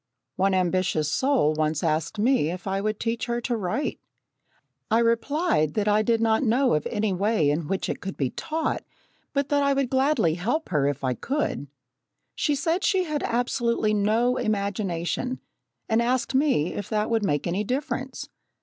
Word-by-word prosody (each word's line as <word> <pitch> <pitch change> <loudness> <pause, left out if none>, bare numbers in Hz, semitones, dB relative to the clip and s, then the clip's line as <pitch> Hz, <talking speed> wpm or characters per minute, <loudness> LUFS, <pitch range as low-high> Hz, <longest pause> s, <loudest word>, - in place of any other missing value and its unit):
One 190 0 +2
ambitious 180 -4 +1
soul 260 - +2
once 155 0 -1
asked 160 +5 0
me 220 - +2
if 180 +1 -6
I 195 0 -1
would 215 0 -2
teach 230 +1 -2
her 240 0 -1
to 240 0 -1
write. 215 +7 -2 0.9
I 225 - +3
replied 230 - +1
that 210 -1 0
I 210 +1 +4
did 230 +1 +2
not 225 -1 +2
know 255 +1 +3
of 150 -1 0
any 210 -3 -1
way 195 -5 +2
in 150 +1 -2
which 195 +2 -1
it - - -4
could 195 - -6
be 135 -3 -1
taught, 315 0 -2 0.5
but 280 -1 -1
that 290 -1 +2
I 280 0 +3
would 275 -2 0
gladly 265 - +2
help 235 - -2
her 150 -5 +2
if 145 -1 -2
I 130 -1 +1
could. 265 - -2 0.7
She 295 - 0
said 330 +6 0
she 380 -2 +2
had 305 -4 -2
absolutely 235 -2 0
no 220 +5 +2
imagination, 200 +2 -2 0.5
and 225 +1 +2
asked 240 +1 0
me 265 - +2
if 205 - -5
that 215 +1 0
would 225 -2 +1
make 145 -7 0
any 180 +4 -1
difference. 265 +2 -3
220 Hz, 175 wpm, -25 LUFS, 180-260 Hz, 0.9 s, I